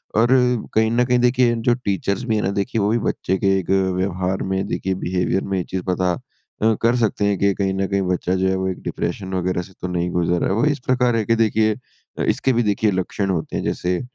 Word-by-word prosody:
और 115 Hz, +3 st, +3 dB
अ, 125 Hz, -3 st, +3 dB
कहीं 110 Hz, 0 st, +3 dB
ना 120 Hz, +1 st, +3 dB
कहीं 125 Hz, 0 st, +2 dB
देखिए 125 Hz, 0 st, +3 dB, 0.2 s
जो 120 Hz, -, +5 dB
टीचर्स 100 Hz, -3 st, -2 dB
भी 115 Hz, -2 st, 0 dB
है 105 Hz, -, +1 dB
ना 95 Hz, -, 0 dB
देखिए 115 Hz, 0 st, -2 dB
वो 100 Hz, -, +2 dB
भी 115 Hz, -, +2 dB
बच्चे 95 Hz, +1 st, -1 dB
के 95 Hz, 0 st, +4 dB
एक 90 Hz, -, -7 dB, 0.3 s
व्यवहार 95 Hz, 0 st, -1 dB
में 95 Hz, +1 st, -1 dB
देखिए 95 Hz, 0 st, -2 dB
बिहेवियर 90 Hz, +1 st, 0 dB
में 95 Hz, -1 st, -2 dB
ये 90 Hz, -, -1 dB
चीज़ 90 Hz, +1 st, -4 dB
पता 90 Hz, 0 st, +1 dB
अ, 110 Hz, +5 st, -3 dB
कर 115 Hz, +1 st, +3 dB
सकते 110 Hz, -3 st, +1 dB
हैं 100 Hz, -1 st, +1 dB
कि 100 Hz, 0 st, +3 dB
कहीं 95 Hz, -1 st, -1 dB
ना 95 Hz, 0 st, 0 dB
कहीं 100 Hz, -1 st, 0 dB
बच्चा 90 Hz, +1 st, 0 dB
जो 95 Hz, 0 st, +1 dB
है 95 Hz, -, +1 dB
वो 95 Hz, 0 st, -1 dB
एक 95 Hz, -, -5 dB
डिप्रेशन 95 Hz, -1 st, -4 dB
वगैरह 90 Hz, 0 st, 0 dB
से 95 Hz, +2 st, -13 dB
तो 90 Hz, -, -2 dB
नहीं 90 Hz, 0 st, -1 dB
गुज़र 85 Hz, 0 st, +1 dB
रहा -, -, +1 dB
है। 95 Hz, -, +1 dB
वो 115 Hz, -, +2 dB
इस 145 Hz, -2 st, +1 dB
प्रकार 125 Hz, -2 st, +2 dB
है 110 Hz, -, +1 dB
कि 115 Hz, -, +2 dB
देखिए 110 Hz, -1 st, +2 dB, 0.5 s
इसके 130 Hz, -, +1 dB
भी 120 Hz, 0 st, +2 dB
देखिए 105 Hz, 0 st, +1 dB
लक्षण 95 Hz, +1 st, -2 dB
होते 85 Hz, -4 st, -2 dB
हैं, -, -, -2 dB
जैसे 90 Hz, 0 st, -1 dB
100 Hz, 250 wpm, -21 LUFS, 95-115 Hz, 0.5 s, जो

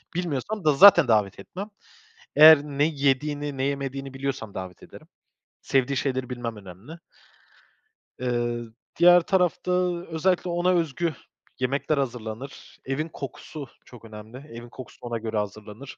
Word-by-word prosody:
bilmiyorsam 175 Hz, +3 st, -3 dB
da 150 Hz, -, +5 dB
zaten 170 Hz, -2 st, +8 dB
davet 105 Hz, -4 st, +1 dB
etmem. 195 Hz, -, -8 dB, 0.7 s
Eğer 155 Hz, -1 st, +9 dB
ne 145 Hz, 0 st, -1 dB
yediğini, 145 Hz, -1 st, -1 dB
ne 130 Hz, -, 0 dB
yemediğini 135 Hz, -1 st, -4 dB
biliyorsam 135 Hz, -6 st, -4 dB
davet 95 Hz, -1 st, -8 dB
ederim. -, -, -14 dB, 0.5 s
Sevdiği 135 Hz, 0 st, 0 dB
şeyleri 130 Hz, -2 st, -2 dB
bilmem 120 Hz, -2 st, -5 dB
önemli. 100 Hz, -, -12 dB, 1.2 s
Iıı, 120 Hz, -2 st, -2 dB, 0.3 s
diğer 175 Hz, 0 st, +7 dB
tarafta 180 Hz, -1 st, 0 dB, 0.4 s
özellikle 175 Hz, +2 st, 0 dB
ona 175 Hz, +1 st, 0 dB
özgü 170 Hz, -1 st, 0 dB, 0.5 s
yemekler 140 Hz, +3 st, -1 dB
hazırlanır, 125 Hz, 0 st, -6 dB
evin 150 Hz, +5 st, -3 dB
kokusu 140 Hz, +1 st, -8 dB, 0.2 s
çok 120 Hz, -2 st, -14 dB
önemli, 110 Hz, +2 st, -11 dB
evin 120 Hz, -4 st, -11 dB
kokusu 125 Hz, -3 st, -12 dB
ona 120 Hz, -1 st, -4 dB
göre 110 Hz, -1 st, -4 dB
hazırlanır. 105 Hz, +5 st, -6 dB
135 Hz, 130 wpm, -25 LUFS, 120-155 Hz, 1.2 s, Eğer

